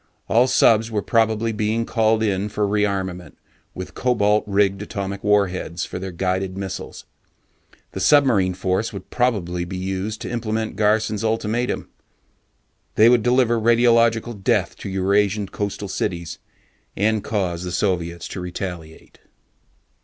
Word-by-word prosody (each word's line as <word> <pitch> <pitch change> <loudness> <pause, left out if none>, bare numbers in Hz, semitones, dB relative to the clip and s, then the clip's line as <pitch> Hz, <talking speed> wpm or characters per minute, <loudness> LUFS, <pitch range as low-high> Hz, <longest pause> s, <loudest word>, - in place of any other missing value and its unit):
All 120 +4 +4
subs 115 -3 +4
were 105 -3 -2
probably 115 0 +1
being 110 +2 -1
called 110 -1 +2
in 100 -1 0
for 105 0 -1
rearmament 100 -3 -2 0.4
with 95 - -7
cobalt 105 -4 +2
rigged 100 -1 +1
atomic 100 -2 -5
warheads 95 -4 0
for - - -6
their 95 0 -5
guided 95 +1 -2
missiles. 95 -2 -6 0.9
The - - -6
submarine 100 -5 +4
force 95 +4 -1
would 100 -3 -9
probably 95 -9 0
be 90 +2 -6
used 95 +3 -3
to - - -5
implement 110 -2 -2
Garson's 105 0 +1
ultimatum. 115 +2 -1 1.1
They 110 +2 +6
would 120 -1 +4
deliver 120 -1 +2
radiological 115 -2 +3
death - - +1
to - - -7
Eurasian 100 +1 +1
coastal 100 0 -4
cities, 85 -2 -3 0.6
and 110 +1 +1
cause 90 -6 -2
the 90 - -4
Soviets 85 -3 -1
to 95 - -6
retaliate. 90 -3 -7
105 Hz, 130 wpm, -22 LUFS, 95-110 Hz, 1.1 s, They